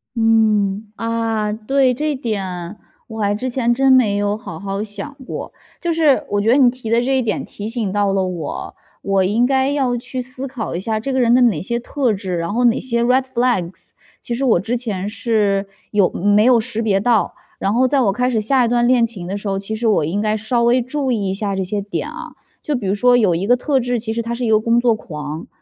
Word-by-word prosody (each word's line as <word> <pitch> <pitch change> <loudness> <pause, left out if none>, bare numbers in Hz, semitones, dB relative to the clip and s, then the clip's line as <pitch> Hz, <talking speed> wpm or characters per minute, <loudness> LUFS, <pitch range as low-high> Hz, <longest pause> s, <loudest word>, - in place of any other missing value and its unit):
嗯， 215 -2 +2
啊， 225 -2 -1
对， 255 +4 +1
这 300 +3 -1
点， 225 -7 -3 0.6
我 225 -1 -8
还 205 0 +1
之 255 +5 -3
前 240 -1 0
真 265 +2 +4
没 220 -6 +4
有 205 0 0
好 210 -8 -8
好 195 +1 -3
想 215 +7 -7
过。 - - -6 0.3
就 345 -1 -1
是 310 -4 +3
我 205 0 +1
觉 215 - +1
得 260 - +5
你 260 -3 +6
提 245 -2 -6
的 230 +1 +3
这 265 +2 +1
一 - - +2
点 230 -3 -2
提 210 +1 -7
醒 225 -5 -2
到 205 -1 +1
了 195 -1 +1
我， 175 -5 -5 0.3
我 195 -1 +2
应 215 +6 +2
该 265 +1 +2
要 265 -4 0
去 245 +2 -5
思 255 +2 -7
考 245 -9 -5
一 - - -2
下 215 +3 -2
这 270 +5 -3
个 260 - +1
人 240 -1 +4
的 255 - +4
哪 215 -11 +2
些 235 +5 -2
特 255 0 -1
质， 190 -3 -3
然 170 +2 -3
后 245 +2 +2
哪 240 +1 +3
些 235 -2 -1
red 250 +2 +3
flags。 240 -8 -1 0.3
其 240 - -4
实 250 +3 -2
我 235 -9 +4
之 225 +6 -2
前 210 -6 -3
是 205 -3 0 0.2
有 200 -4 +3
没 205 +2 +3
有 245 0 +5
识 225 0 -2
别 205 -4 +2
到， 225 +1 +1 0.2
然 195 - 0
后 255 +3 +3
在 275 +1 +2
我 210 -5 +3
开 250 +5 0
始 225 -4 0
下 255 +3 +3
一 - - 0
段 240 0 +2
恋 245 -1 +4
情 200 -7 -6
的 195 +2 -3
时 205 - -6
候， 195 -1 -1
其 200 +3 -4
实 225 +1 -1
我 210 -7 +3
应 175 +7 -2
该 215 0 +1
稍 220 +3 0
微 240 +2 +3
注 265 +2 -2
意 205 -5 -1
一 - - -1
下 200 0 -2
这 190 - -1
些 205 +3 -2
点 205 +1 -4
啊。 - - -8 0.3
就 300 - -1
比 245 -6 -3
如 190 - +1
说 245 +4 +4
有 205 -8 +3
一 180 +4 -2
个 245 - +5
特 270 +2 0
质， 245 -1 -1
其 220 0 -4
实 230 +1 -1
他 235 +1 -3
是 240 +1 -4
一 235 - 0
个 215 -1 +4
工 230 +2 +2
作 240 -1 +3
狂， 150 -4 -7
225 Hz, 280 characters per minute, -19 LUFS, 205-250 Hz, 0.6 s, 你